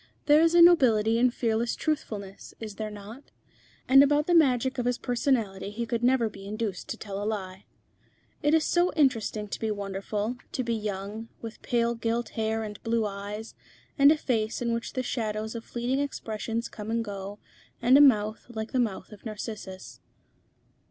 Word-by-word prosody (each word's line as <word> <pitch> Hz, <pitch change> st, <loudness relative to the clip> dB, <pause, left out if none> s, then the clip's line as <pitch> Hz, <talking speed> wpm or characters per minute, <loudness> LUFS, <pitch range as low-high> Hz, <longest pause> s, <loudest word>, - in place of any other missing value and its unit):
There 300 Hz, +1 st, +6 dB
is 330 Hz, +1 st, +3 dB
a 345 Hz, -, +9 dB
nobility 230 Hz, -10 st, +5 dB
in 250 Hz, +1 st, +5 dB
fearless 235 Hz, -1 st, -1 dB
truthfulness, 210 Hz, -10 st, -4 dB
is 215 Hz, -3 st, -7 dB
there 215 Hz, -1 st, -3 dB
not? 210 Hz, +6 st, -11 dB, 0.6 s
and 270 Hz, +1 st, +8 dB
about 290 Hz, +1 st, +3 dB
the 350 Hz, -, +1 dB
magic 260 Hz, -5 st, +3 dB
of 245 Hz, -, -1 dB
his 245 Hz, 0 st, +1 dB
personality 235 Hz, -7 st, -1 dB
he 230 Hz, +3 st, -4 dB
could 230 Hz, 0 st, -2 dB
never 250 Hz, -2 st, +3 dB
be 200 Hz, -2 st, -10 dB
induced 210 Hz, -2 st, -4 dB
to -, -, -4 dB
tell 200 Hz, -2 st, -6 dB
a -, -, -3 dB
lie. 195 Hz, -3 st, -4 dB, 0.8 s
It 295 Hz, +1 st, +3 dB
is 320 Hz, -, +2 dB
so 350 Hz, +1 st, +2 dB
interesting 225 Hz, -7 st, +1 dB
to -, -, -5 dB
be 220 Hz, -, -1 dB
wonderful, 205 Hz, +3 st, -3 dB, 0.2 s
to 255 Hz, -, -1 dB
be 235 Hz, -1 st, -1 dB
young, 210 Hz, +1 st, -4 dB
with 225 Hz, -1 st, -9 dB
pale 235 Hz, -1 st, +1 dB
gilt 230 Hz, 0 st, -2 dB
hair 220 Hz, 0 st, -1 dB
and 210 Hz, -1 st, -7 dB
blue 230 Hz, -1 st, 0 dB
eyes, 205 Hz, +2 st, -6 dB, 0.4 s
and 280 Hz, 0 st, +7 dB
a 315 Hz, -, +3 dB
face 225 Hz, -6 st, -1 dB
in 235 Hz, -1 st, -1 dB
which 230 Hz, 0 st, -4 dB
the 255 Hz, -, -2 dB
shadows 220 Hz, -3 st, -3 dB
of 230 Hz, -1 st, -6 dB
fleeting 245 Hz, +4 st, -2 dB
expressions 230 Hz, -4 st, -3 dB
come 210 Hz, -1 st, -8 dB
and 230 Hz, 0 st, 0 dB
go, 200 Hz, 0 st, -6 dB, 0.4 s
and 245 Hz, +2 st, +5 dB
a 285 Hz, -, +8 dB
mouth 215 Hz, -6 st, +3 dB
like 220 Hz, -2 st, -5 dB
the 260 Hz, -, 0 dB
mouth 210 Hz, -5 st, -2 dB
of 210 Hz, -, -13 dB
Narcissus. 210 Hz, -3 st, -7 dB
225 Hz, 185 wpm, -27 LUFS, 210-250 Hz, 0.8 s, a